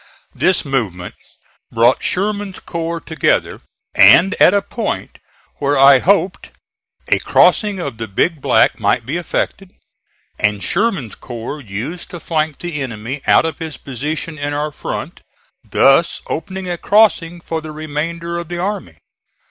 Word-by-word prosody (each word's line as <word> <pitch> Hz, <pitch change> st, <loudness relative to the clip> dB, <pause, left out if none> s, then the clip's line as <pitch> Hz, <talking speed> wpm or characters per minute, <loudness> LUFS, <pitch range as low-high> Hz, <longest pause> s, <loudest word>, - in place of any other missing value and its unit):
This 185 Hz, -3 st, +1 dB
movement 105 Hz, -11 st, -2 dB, 0.6 s
brought 120 Hz, +2 st, +3 dB
Sherman's 200 Hz, 0 st, -2 dB
corps 170 Hz, 0 st, -4 dB
together, 160 Hz, -1 st, -1 dB, 0.3 s
and 190 Hz, +4 st, +7 dB
at -, -, +8 dB
a 200 Hz, 0 st, +1 dB
point 230 Hz, -, -4 dB, 0.4 s
where 145 Hz, 0 st, +1 dB
I 135 Hz, 0 st, +7 dB
hoped 195 Hz, +3 st, +1 dB, 0.6 s
a -, -, +3 dB
crossing 210 Hz, -2 st, +3 dB
of 115 Hz, -10 st, -5 dB
the 115 Hz, -, -4 dB
Big 150 Hz, -, 0 dB
Black 125 Hz, -5 st, +3 dB
might 110 Hz, +3 st, +1 dB
be 145 Hz, +7 st, -2 dB
effected 180 Hz, +2 st, -3 dB, 0.7 s
and 105 Hz, -1 st, 0 dB
Sherman's 195 Hz, -, 0 dB
corps 120 Hz, +5 st, -7 dB
used 120 Hz, -, -6 dB
to 175 Hz, -, -7 dB
flank 155 Hz, -3 st, -1 dB
the 170 Hz, -4 st, -4 dB
enemy 125 Hz, +2 st, -5 dB
out -, -, +5 dB
of 160 Hz, -3 st, -4 dB
his 160 Hz, -2 st, -6 dB
position 150 Hz, +4 st, -5 dB
in 145 Hz, 0 st, -2 dB
our 150 Hz, +1 st, -2 dB
front, -, -, -6 dB, 0.4 s
thus 135 Hz, +5 st, +3 dB
opening 190 Hz, +3 st, -5 dB
a 175 Hz, -1 st, -3 dB
crossing 190 Hz, -5 st, +3 dB
for 165 Hz, -1 st, -4 dB
the 155 Hz, 0 st, -8 dB
remainder 165 Hz, +3 st, -4 dB
of 170 Hz, -, -7 dB
the 175 Hz, +1 st, -5 dB
army. 175 Hz, -, -4 dB
155 Hz, 145 wpm, -17 LUFS, 135-175 Hz, 0.7 s, at